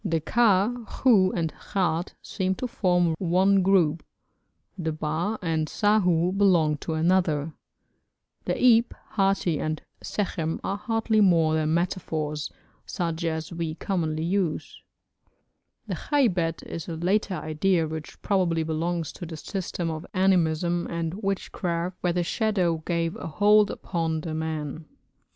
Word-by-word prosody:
The 165 -1 0
ka, 210 +3 +3
khu, 200 -8 +3
and 165 -3 -1
khat 175 -3 -2
seem 190 -1 -1
to 255 - -4
form 180 -6 +2
one 190 +2 +3
group; 175 -4 +3 0.7
the 165 -4 -2
ba 155 +7 -2
and 160 -2 0
sahu 180 -3 +2
belong 175 -7 +3
to 160 +2 -4
another; 160 -2 +1 0.9
the - - 0
ab, 235 -1 +4
hati, 195 -5 +1
and 155 0 -2 0.2
sekhem 165 -6 -2
are 200 - -2
hardly 225 0 +1
more 165 -5 +4
than 155 0 +1
metaphors, 160 -4 -2 0.4
such 170 -3 -3
as 160 +1 -3
we 165 -2 -3
commonly 160 -5 -2
use; 175 -2 -2 1.0
the - - -4
khaybet 185 - 0
is 165 - -7
a 165 - -4
later 190 +4 0
idea 160 +2 0
which 155 -1 -7
probably 180 -5 +1
belongs 160 +1 -2
to 175 - -8
the 160 -1 -7
system 175 -1 -3
of 160 0 -5
animism 175 -2 +2
and 165 -1 -3
witchcraft, 180 -3 -2
where 175 -1 +1
the 175 0 0
shadow 185 -4 +1
gave 170 -1 0
a - - -6
hold 205 +5 +4
upon 165 -3 -2
the 160 0 -5
man. 155 -1 -4
170 Hz, 135 wpm, -26 LUFS, 160-195 Hz, 1.0 s, ab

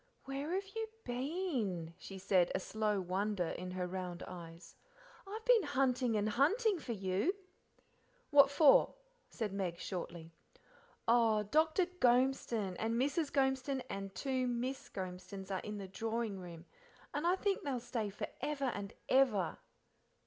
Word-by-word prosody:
"Where 275 +5 -3
have 390 +1 -1
you 445 0 -2 0.2
been?" 245 - -2
she 195 - -8
said, 185 -2 +3
a - - +2
slow 210 +1 0
wonder 190 0 -1
in 180 0 -5
her 180 0 -2
round 180 -1 -4
eyes. 170 -1 -10 0.5
"I've 435 +3 -6
been - - +6
hunting 260 - +1
and 210 0 +1
hunting 360 - +3
for 245 -5 -4
you." 195 - 0 1.0
"What 280 -1 +8
for?" 285 0 +6 0.3
said 215 -5 -3
Meg 185 -4 -2
shortly. 170 -3 -5 0.8
"Oh, 225 -2 +4
Dr. 315 - +3
Gormeston 250 - +2
and 225 +1 0
Mrs. 290 +3 +1
Gormeston 265 -1 +1
and 195 0 -5
two 260 -2 0
Miss 245 +2 -2
Gormestons 190 +1 -6
are 190 - 0
in 210 +2 -5
the 195 -1 -6
drawing 220 +1 -2
room, 170 -2 -9 0.5
and 295 +4 0
I 360 - +4
think 395 0 0
they'll 270 -4 -2
stay 230 -3 -3
for 200 - -4 0.2
ever 280 -4 -1
and 200 -1 -5
ever." 240 -10 +3
230 Hz, 145 wpm, -35 LUFS, 190-275 Hz, 1.0 s, What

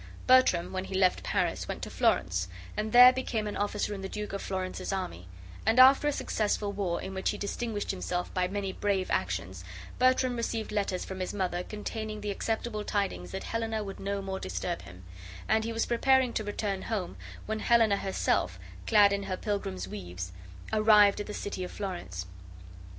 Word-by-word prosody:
Bertram, 255 -11 +4
when 185 0 -2
he 190 - -5
left 185 -1 +3
Paris, - - -1
went - - -5
to - - -5
Florence, 90 0 +1 0.3
and 215 +1 -2
there 250 +2 +10
became 235 -4 -2
an 210 - -4
officer 205 0 -1
in 195 - -6
the 190 - -5
Duke 210 0 -5
of 200 - -3
Florence's 185 0 -3
army, 90 - -4 0.4
and 225 +3 +3
after 270 +3 +8
a - - +3
successful 210 -6 -1
war, 190 -4 -1
in 190 - -6
which 190 0 -1
he 210 - -2
distinguished 205 +1 -3
himself 180 -2 -3
by 180 -1 +1
many 195 0 -3
brave 195 -2 -1
actions, 95 0 -2 0.4
Bertram 255 0 +3
received 230 -1 -2
letters 200 -3 -1
from 190 0 -6
his 185 - -3
mother 180 -3 -1
containing 215 +2 -5
the 205 0 -2
acceptable 220 +1 -2
tidings 205 -1 -2
that 190 - -5
Helena 225 -1 -2
would 195 -1 -7
no 200 0 -2
more 190 0 -4
disturb 90 -1 -3
him; 90 +1 -13 0.4
and 220 0 +2
he 230 - -2
was 225 0 0
preparing 260 +1 +3
to 215 - -1
return 205 -2 -2
home, 200 - -3 0.3
when 220 0 -2
Helena 225 -3 +4
herself, 195 -1 0 0.3
clad 205 -2 +6
in 200 - -1
her 185 -2 -3
pilgrim's 100 - -3
weeds, 90 -2 -6 0.4
arrived 210 -2 +6
at 205 - -4
the - - -5
city 200 -2 -4
of 180 - -5
Florence. 95 - -5
200 Hz, 185 wpm, -29 LUFS, 185-220 Hz, 0.4 s, there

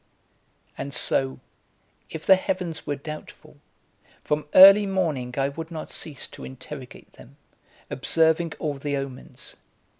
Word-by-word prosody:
And 140 0 -5
so, 130 -1 -1 0.7
if 160 - -8
the 190 - +8
heavens 185 -3 -4
were 145 - -1
doubtful, 155 +2 -10 0.7
from 150 0 -1
early 195 +2 +10
morning 155 -10 -1
I 135 0 +1
would 160 +3 -7
not 160 -2 -7
cease 145 -5 -5
to - - -12
interrogate 65 0 -10
them, - - -17 0.5
observing 160 +4 +1
all 150 -2 -2
the 145 0 -2
omens. 135 -1 -8
155 Hz, 125 wpm, -25 LUFS, 135-170 Hz, 0.7 s, early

